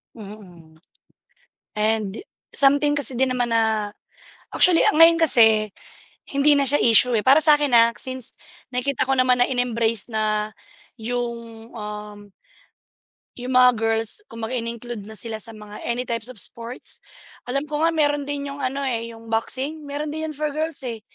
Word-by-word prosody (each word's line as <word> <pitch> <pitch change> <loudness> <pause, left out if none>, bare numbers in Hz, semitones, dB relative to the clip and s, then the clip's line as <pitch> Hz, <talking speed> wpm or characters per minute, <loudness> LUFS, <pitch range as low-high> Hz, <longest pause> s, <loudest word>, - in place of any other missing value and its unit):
Mhm. 190 -7 -13 1.0
And 215 -1 0 0.4
something 285 +1 +4
kasi 275 -4 +2
di 265 - +3
naman 250 -2 -1
na 220 -2 0 0.6
actually 355 -2 +4
ang - - -1
ngayon 330 +1 +6
kasi, 220 -8 +5 0.6
hindi 280 +1 +3
na 285 -1 +2
siya 290 - +4
isyu, 235 +1 +5
eh, 210 - -2
para 275 +4 +6
sa'kin, 295 -3 +4
ah, 230 0 +6
since 260 -2 -4 0.4
nakikita 255 +2 -2
ko 270 - +2
naman 255 -1 +3
na - - +3
in-embrace 230 -4 -1
na 215 0 -1 0.5
yung 235 -1 -5
um 210 -1 -9 1.1
yung 250 +1 -4
mga 250 0 +7
girls, 225 - 0
kumbaga 230 +2 -5
in-include 230 -2 -7
na 220 - -10
sila 220 +2 -3
sa 225 +1 -6
mga 210 -1 -11
any 240 +1 -1
types 230 -2 -4
of 255 - -10
sports. 230 +4 -4 0.5
Alam 275 +3 -2
ko 300 0 -5
nga 325 - +3
meron 290 -2 0
din 285 -1 -4
yung 280 - -9
ano, 275 +1 -3
eh, 230 -4 -2
yung 225 0 -13
boxin, 275 +7 -3
meron 295 +1 -4
din 315 +1 -4
yun 310 - -7
for 300 +1 -2
girls 310 -1 -3
eh. 235 -3 -5
245 Hz, 160 wpm, -22 LUFS, 225-280 Hz, 1.1 s, mga